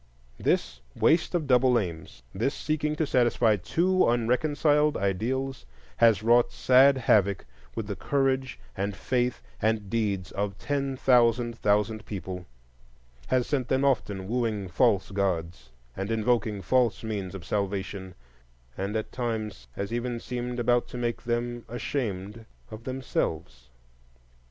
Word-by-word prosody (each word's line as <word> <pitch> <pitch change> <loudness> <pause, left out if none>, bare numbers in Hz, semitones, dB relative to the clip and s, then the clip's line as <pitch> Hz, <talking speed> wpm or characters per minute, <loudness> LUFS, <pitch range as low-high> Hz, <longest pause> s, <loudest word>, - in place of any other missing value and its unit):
This - - 0
waste 165 +2 +2
of 165 -3 0
double 125 -2 +4
aims, 85 -7 -5
this 120 +9 -1
seeking 155 0 -1
to 160 - 0
satisfy 120 -4 +3
two 180 - +2
unreconciled 145 +5 +2
ideals, 120 - -2 0.3
has 115 -3 +4
wrought 120 +1 +4
sad 135 +2 +5
havoc 100 -6 +2 0.3
with 115 - -3
the 100 -1 -4
courage 135 - 0 0.2
and 100 +1 -2
faith 125 -1 -1 0.2
and 110 -3 0
deeds 100 -6 -1
of 100 0 -3
ten 140 -2 -2
thousand 120 -2 +3
thousand 105 0 0
people,—has 60 - -6
sent 130 -4 -1
them 130 +2 +1
often 100 -8 0
wooing 110 -4 -1
false 100 -1 +2
gods 85 -8 -2 0.3
and 95 +2 -4
invoking 110 -2 0
false 125 +3 +2
means 100 -4 -4
of 90 -3 -8
salvation, 95 -1 -3 0.6
and 100 +3 -3
at 110 - -2
times 110 - -4
has 100 - -4
even 120 0 -2
seemed 125 0 -4
about 120 0 +2
to - - -8
make 120 -1 -2
them 120 0 -2
ashamed 110 -3 -4 0.2
of 110 +2 -9
themselves. 80 - -3
115 Hz, 130 wpm, -27 LUFS, 100-125 Hz, 0.6 s, sad